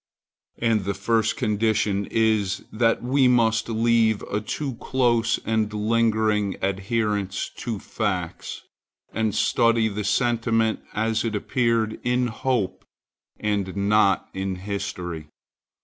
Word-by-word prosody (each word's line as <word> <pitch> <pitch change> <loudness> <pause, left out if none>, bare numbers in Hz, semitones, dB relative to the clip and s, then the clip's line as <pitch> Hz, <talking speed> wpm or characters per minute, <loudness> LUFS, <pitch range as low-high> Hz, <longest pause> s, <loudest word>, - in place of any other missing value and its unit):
And 115 -3 +1
the 100 0 -1
first 110 +3 +1
condition 105 -2 +1
is, 110 -4 +1
that 115 +1 +1
we 130 +1 +3
must 115 -2 +2
leave 115 -1 +2
a 105 - -3
too 135 +5 -3
close 120 -3 +2
and 110 -1 0
lingering 110 -1 +1
adherence 100 0 -1
to 115 -3 -3
facts, 95 -4 -4 0.5
and 110 -2 0
study 115 -1 +3
the 105 0 -4
sentiment 115 0 +1
as 110 +1 0
it 115 -2 -2
appeared 115 0 0
in 125 0 +1
hope 110 -6 -1 0.6
and 100 -3 -1
not 100 -1 +3
in 95 0 -3
history. 90 -4 -5
110 Hz, 115 wpm, -24 LUFS, 100-115 Hz, 0.6 s, we